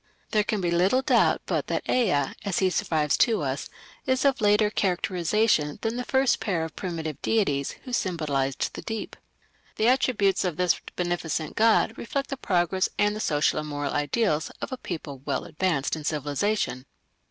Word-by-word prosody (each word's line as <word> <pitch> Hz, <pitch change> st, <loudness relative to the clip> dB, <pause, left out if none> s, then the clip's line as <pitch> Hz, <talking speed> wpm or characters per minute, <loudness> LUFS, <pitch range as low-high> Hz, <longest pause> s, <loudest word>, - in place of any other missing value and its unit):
There 210 Hz, -1 st, +3 dB
can 210 Hz, -1 st, -1 dB
be 175 Hz, -1 st, 0 dB
little 190 Hz, +10 st, +3 dB
doubt -, -, +3 dB
but -, -, -1 dB
that -, -, -2 dB
Ea, 180 Hz, -, +2 dB
as 200 Hz, -3 st, -1 dB
he 190 Hz, -1 st, +2 dB
survives 155 Hz, -4 st, +1 dB
to 225 Hz, -, +3 dB
us, 135 Hz, 0 st, -3 dB, 0.4 s
is 260 Hz, +1 st, +1 dB
of 275 Hz, -3 st, +3 dB
later 210 Hz, 0 st, +4 dB
characterization 180 Hz, -3 st, +1 dB
than 225 Hz, +1 st, -1 dB
the 250 Hz, -, -2 dB
first 265 Hz, +1 st, +2 dB
pair 180 Hz, -6 st, -1 dB
of 160 Hz, -2 st, -6 dB
primitive 160 Hz, -6 st, -4 dB
deities 145 Hz, -11 st, +1 dB
who 255 Hz, -, -8 dB
symbolized 145 Hz, -, -1 dB
the -, -, -6 dB
deep. 225 Hz, -1 st, -5 dB, 0.6 s
The 220 Hz, -, +2 dB
attributes 240 Hz, -6 st, +2 dB
of 175 Hz, -4 st, -2 dB
this 180 Hz, -1 st, +2 dB
beneficent 170 Hz, -3 st, -2 dB
god 225 Hz, 0 st, +3 dB
reflect 275 Hz, +4 st, -3 dB
the 275 Hz, -, -2 dB
progress, 185 Hz, -3 st, +1 dB
and 205 Hz, 0 st, +2 dB
the -, -, -5 dB
social 150 Hz, -7 st, +1 dB
and 150 Hz, -, -5 dB
moral 145 Hz, -1 st, -3 dB
ideals 155 Hz, +2 st, 0 dB
of -, -, -5 dB
a 260 Hz, -, -3 dB
people 155 Hz, -, -6 dB
well -, -, -2 dB
advanced 165 Hz, -5 st, -1 dB
in 155 Hz, -, -7 dB
civilization. 145 Hz, -1 st, -1 dB
180 Hz, 175 wpm, -26 LUFS, 150-220 Hz, 0.6 s, later